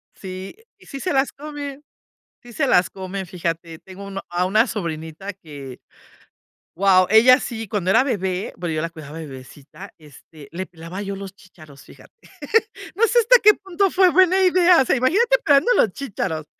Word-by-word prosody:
Sí, 190 - -8 0.2
sí 275 - -10
se 365 - -2
las 270 0 +1
comen, 290 -1 -8 0.6
sí 240 -1 -13
se 275 +1 0
las 180 -6 +3
comen, 190 0 -6
fíjate, 165 -2 -5
tengo 190 +1 -12
uno 195 0 -6
a 175 +1 -1
una 215 +6 +2
sobrinita 170 -1 -6
que 145 -8 -11 1.0
guau. 185 0 +4
Ella 245 +4 +6
sí, 225 -5 -6
cuando 195 -4 -2
era 225 +7 +4
bebé, 190 -7 -3
bueno, 170 -2 -4
yo 155 - -1
la 165 - -3
cuidaba 155 -1 -11
de 160 - -7
bebecita, 140 +7 -13
este, 150 0 -16
le 185 +3 -5
pelaba 170 +2 -9
yo 200 -1 -5
los 195 -1 -9
chicharos, 155 -8 -17
fíjate. - - -18 0.8
No 460 +4 +3
sé 480 - +3
hasta 485 +2 +6
qué 425 0 +7
punto 385 0 -1
fue 375 -1 +4
buena 375 +1 +4
idea, 360 -3 +5
o - - 0
sea, - - +2
imagínate 415 - +2
pelando 285 - +4
los 210 - +3
chícharos. 165 - -5
195 Hz, 175 wpm, -21 LUFS, 170-275 Hz, 1.0 s, qué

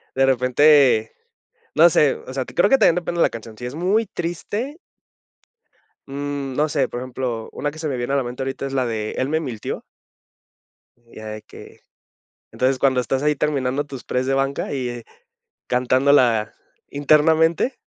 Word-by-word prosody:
de 135 0 +4
repente, 130 -2 +4 0.6
no - - +7
sé, - - +3
o 455 +1 -10
sea, - - -2
creo - - +1
que 270 - +5
también 170 - +5
depende 175 0 -3
de - - +4
la - - +3
canción. 110 -1 -10
Si 125 - -6
es 125 - -6
muy 195 +7 +1
triste 205 - -4 1.3
mm, 140 -1 -4
no 150 +3 +1
sé, 140 -3 +1
por 120 - -6
ejemplo, 125 -3 -4
una 145 - -3
que 155 - -12
se 160 - -3
me 130 - -2
viene 120 +3 -2
a - - +3
la 140 - +1
mente 125 +2 -6
ahorita 135 +1 -4
es 135 - -4
la 130 -2 +1
de 110 -2 -3
"Él 130 - -1
me 160 +1 +1
mintió". 120 -8 -5 1.2
Ya 110 -2 -12
de 110 0 -6
que - - -14 0.7
entonces, 130 +1 +1
cuando 130 -2 +3
estás 130 +2 -2
ahí 150 0 +2
terminando 140 -1 -1
tus 135 -3 -8
press 125 +1 -1
de 135 - +1
banca 135 +1 -1
y, 130 -3 -2
eh, 120 -1 -7 0.6
cantándola 125 -3 +2 0.3
internamente 160 - +2
135 Hz, 180 wpm, -21 LUFS, 125-150 Hz, 1.3 s, no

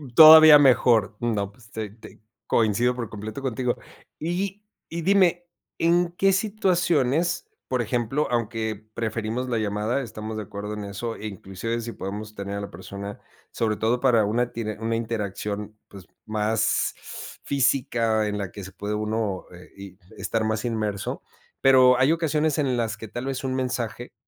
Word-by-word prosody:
Todavía 155 0 +11
mejor. 120 -6 +4
No, 105 -4 -1
pues, 110 +1 -20
te 110 -2 -4
te 110 +2 -15 0.3
coincido 115 +3 +2
por 120 -3 -5
completo 110 +4 -7
contigo. 125 -1 -1 0.4
Y 195 +5 -3 0.3
y 170 +1 -4
dime, 175 -1 +3 0.3
en 170 +1 +2
qué 195 +2 +3
situaciones, 175 - +1 0.2
por 130 -1 0
ejemplo, 120 +5 -1
aunque 110 -2 -2
preferimos 115 +2 -3
la 120 - 0
llamada, 105 +4 -1
estamos 110 -2 -6
de 110 - -3
acuerdo 105 +1 -6
en 105 -1 -5
eso, 115 +3 -5
e 110 - -6
inclusive 100 +4 -4
si 115 +1 -5
podemos 105 +1 -6
tener 100 0 -5
a - - -4
la 100 - -6
persona, 100 +3 -8 0.3
sobre 110 -2 0
todo 115 +3 +1
para 120 -4 +4
una 120 +4 0
tiene 110 -2 -4
una 115 0 -1
interacción, 105 -2 -4
pues, 95 -3 -13 0.2
más 110 +1 0 0.5
física 115 -5 +1
en 105 0 -2
la 100 -3 -4
que 100 - -8
se 95 - -9
puede 105 +2 -4
uno, 105 -2 -2
eh, 90 0 -13
y, 100 -1 -11 0.2
estar 110 -1 -1
más 110 0 -1
inmerso. 110 -4 -2 0.4
Pero, 130 -1 +6
hay 135 +5 +4
ocasiones 155 -2 0
en 130 -4 +1
las 115 -2 -1
que 110 -1 -9
tal 120 +4 -5
vez, 135 -1 -3
un 130 -1 -2
mensaje 120 -2 -3
115 Hz, 165 wpm, -25 LUFS, 105-130 Hz, 0.5 s, Todavía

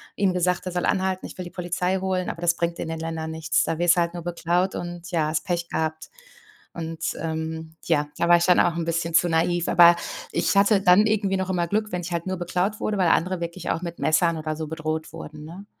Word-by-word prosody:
ihm 195 -2 +1
gesagt, 180 0 0
er 185 - -3
soll 180 0 -1
anhalten, 190 0 0
ich - - -10
will 180 - -5
die 175 - -9
Polizei 180 +1 -1
holen, 185 -1 -1
aber 165 - -6
das 170 -1 +2
bringt 170 0 -2
in - - -3
den 160 0 -4
Ländern 160 -1 -4
nichts. 160 0 +1
Da 165 - -2
wirst 175 +1 +4
halt 170 -1 +1
nur 175 -2 -6
beklaut 175 +2 0
und 175 -1 -6
ja, 160 -3 +1
hast 155 +1 -2
Pech 170 -2 -2
gehabt. 160 0 -3 0.6
Und, 165 -1 -6 0.2
ähm, 160 0 -4
ja, 150 -3 +1
da 170 - +1
war 175 0 +7
ich 170 - +1
dann 180 -1 +5
auch 170 - +3
'n 170 - -2
bisschen 165 0 -1
zu 175 +1 +4
naiv, 170 +1 +1
aber 175 0 +7 0.4
ich - - 0
hatte 200 0 +4
dann 190 +3 +6
irgendwie 200 -3 +1
noch 190 0 -2
immer 175 -2 0
Glück, 215 +3 -1
wenn 180 - -2
ich 175 +1 -6
halt 170 -1 -2
nur 185 -1 -2
beklaut 180 +4 -1
wurde, 210 - -1
weil 185 -2 +3
andere 180 +2 +1
wirklich 170 +1 -5
auch 165 - -1
mit 170 -1 -6
Messern 165 +1 +2
oder 155 0 -3
so 155 -1 -5
bedroht 155 0 -4
wurden, 155 -2 -9
ne? 180 +6 -10
170 Hz, 245 wpm, -24 LUFS, 160-180 Hz, 0.6 s, war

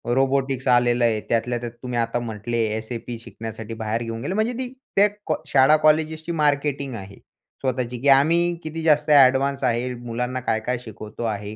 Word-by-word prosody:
Robotics 135 0 0
आलेलं 120 -1 +3
आहे. 110 -2 +1
त्यातल्या 120 +1 0
त्यात 120 0 -6
तुम्ही 125 -1 -2
आता 115 +1 0
म्हटले, 115 0 -4 0.2
एस-ए-पी 115 +1 -6
शिकण्यासाठी 115 -1 -8
बाहेर 110 +1 -2
घेऊन 115 0 -5
गेले, 145 +9 -3
म्हणजे 220 +4 0
ती 255 0 -4 0.2
त्या 200 +1 +6 0.4
शाळा-कॉलेजची 155 +3 +3
मार्केटिंग 145 -4 0
आहे. 100 -2 -9 0.5
स्वतःची 125 -2 -2
की 140 - -1
आम्ही 165 +6 +4
किती 160 +1 -5
जास्त 155 -1 +3
ॲडव्हान्स 135 0 +5
आहे, 120 +2 0
मुलांना 120 +1 -4
काय-काय 115 +1 -1
शिकवतो 110 -1 -9
आहे. 105 -2 -3
125 Hz, 155 wpm, -23 LUFS, 115-145 Hz, 0.5 s, त्या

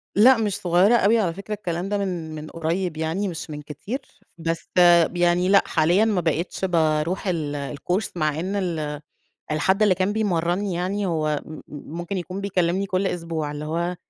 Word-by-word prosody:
لأ 245 +4 +7
مش 210 -3 0
صغيرة 185 +6 +4
أوي 225 +1 +4
على 175 -5 0
فكرة 200 +3 -6
الكلام 185 -2 -3
ده 205 - 0
من 175 -5 -3
من 155 0 -7
قريب 165 0 -2
يعني 165 +6 -1
مش 165 -2 -6
من 150 -1 -6
كتير، 195 - -6 0.4
بس 165 0 -3 0.5
يعني 175 +1 +2
لأ 200 0 +6
حاليًا 175 +7 +3
ما 200 -5 +1
بقيتش 170 +4 -1
باروح 165 +1 +1
ال 145 -4 -2
الCourse 185 +8 -1
مع 155 -2 0
إن 190 +4 -2
ال 155 -6 -2 0.5
الحد 190 +7 +2
اللي 205 -3 +5
كان 190 +2 0
بيمرني 185 -2 0
يعني 195 +3 -1
هو 155 -4 0
م 155 - -10
م - - -10 0.3
ممكن 175 +3 -4
يكون 185 +2 -5
بيكلمني 190 -1 0
كل 185 +1 0
أسبوع، 165 -4 -3
اللي 150 +1 -5
هو 170 +3 -2
175 Hz, 180 wpm, -23 LUFS, 160-195 Hz, 0.5 s, لأ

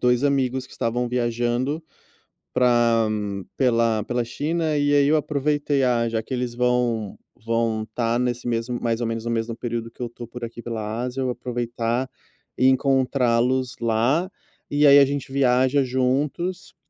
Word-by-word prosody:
2 125 0 +2
amigos 130 -2 +1
que - - -18
estavam 120 +1 -1
viajando 120 +5 -1 0.7
para 120 -3 +3 0.5
pela 115 -4 +2
pela 120 +1 -1
China, 155 +5 -1
e 145 0 +2
aí 140 -1 +4
eu 155 - +4
aproveitei, 145 -1 0
"ah, 120 -2 +2
já 115 -1 -2
que 130 - -5
eles 125 -1 -2
vão 120 -4 0 0.3
vão 115 -1 0
estar 115 +2 -1
nesse 125 -1 -2
mesmo 120 +1 -2
mais 115 -1 -1
ou 120 - 0
menos 115 0 -3
no 120 - -2
mesmo 115 0 -1
período 115 -1 -4
que - - -27
eu - - -1
estou 120 0 -9
por 120 +1 -7
aqui 115 0 -7
pela 110 -1 -4
Ásia, 125 +1 -3
eu 130 -1 0
aproveitar 120 0 -2 0.5
e 130 - +3
encontrá-los 130 -2 +2
lá. 120 +10 +1 0.4
E 145 +1 +2
aí 140 0 +9
a 140 - +8
gente 140 -1 -4
viaja 130 +1 +3
juntos". 135 +8 -1
125 Hz, 165 wpm, -23 LUFS, 115-135 Hz, 0.7 s, aí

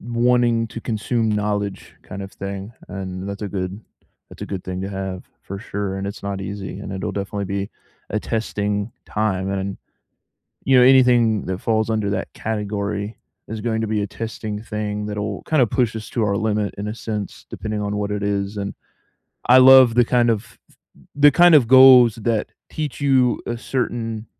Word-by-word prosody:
wanting 120 0 +2
to 115 - -8
consume 115 +1 -1
knowledge 105 -1 -2
kind 95 +1 -8
of 95 - -9
thing, 100 +2 -6 0.2
and 95 0 -6
that's 100 +1 -6
a 105 - -3
good 95 +1 -4 0.5
that's - - -11
a - - -4
good 95 -2 -5
thing 90 0 -4
to 95 - -3
have, 95 -2 -5 0.2
for 100 - -7
sure, 100 -2 -4
and 95 - -4
it's 100 - -7
not 100 -1 -4
easy, 100 -1 -6
and 100 - -7
it'll 95 0 -4
definitely 100 0 -3
be 100 +1 -3 0.4
a 105 - 0
testing 105 -1 -2 0.2
time, 95 -3 -1
and, 95 0 -3 0.9
you 135 -1 +4
know, 125 - +7
anything 120 -5 +4
that 95 0 -3
falls 110 -1 0
under 110 -2 0
that - - -3
category 105 -1 -3 0.3
is 110 0 -5
going 110 -2 -1
to 110 - -2
be 105 -1 0
a - - -3
testing 110 -1 -5
thing 105 -1 -4
that'll 105 -1 -4
kinda 150 -6 +3
push 120 +1 0
us 110 -1 -7
to 115 - 0
our 100 -1 +1
limit 105 -2 -1
in 105 +1 -4
a 105 - -3
sense, 105 -4 -5
depending 110 -1 -4
on 105 0 -2
what 105 0 -2
it 105 - -2
is, 100 0 -1
and 100 0 -4 0.7
I 125 +1 +7
love 130 -2 +8
the 120 - +6
kind 120 0 +2
of 110 -1 -3 0.6
the 145 0 +6
kind 175 +4 +6
of 130 -6 +5
goals 130 -3 +8
that 115 -1 -1 0.2
teach 150 -3 -5
you 130 -3 +3
a 120 - -3
certain 115 -3 -3
105 Hz, 185 wpm, -21 LUFS, 100-115 Hz, 0.9 s, love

